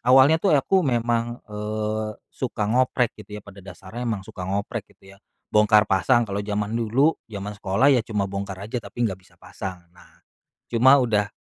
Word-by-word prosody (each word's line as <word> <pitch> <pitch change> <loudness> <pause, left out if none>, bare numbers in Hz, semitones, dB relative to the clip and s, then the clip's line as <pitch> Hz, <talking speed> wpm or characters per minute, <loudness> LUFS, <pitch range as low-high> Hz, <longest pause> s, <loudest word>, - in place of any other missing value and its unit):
awalnya 135 +5 +6
tuh, 175 -5 +4
aku 190 +7 +2
memang, 120 -4 0
e 105 -2 -10 0.8
suka 120 -4 -3
ngoprek 125 +2 +1
gitu 105 0 -9
ya, 105 - -11
pada 100 -1 -13
dasarnya 95 +6 -7
emang 105 -4 -3
suka 90 -1 -7
ngoprek, 100 +1 -3
gitu 95 0 -17
ya. - - -16 0.4
Bongkar 105 0 +5
pasang 105 +5 +3
kalau 100 -2 -4
jaman 105 +1 -2
dulu 120 +7 +3 0.2
jaman 100 -1 -6
sekolah 105 +7 +2
ya, 125 - +4
cuma 105 -4 -1
bongkar 100 0 -5
aja 115 +3 -4
tapi 120 +1 -4
enggak 95 -4 -2
bisa 95 - -25
pasang. 95 -1 -7 0.2
Nah, 90 - -22 0.4
cuma 130 +4 +5
udah 105 -5 +1
105 Hz, 180 wpm, -24 LUFS, 100-125 Hz, 0.8 s, awalnya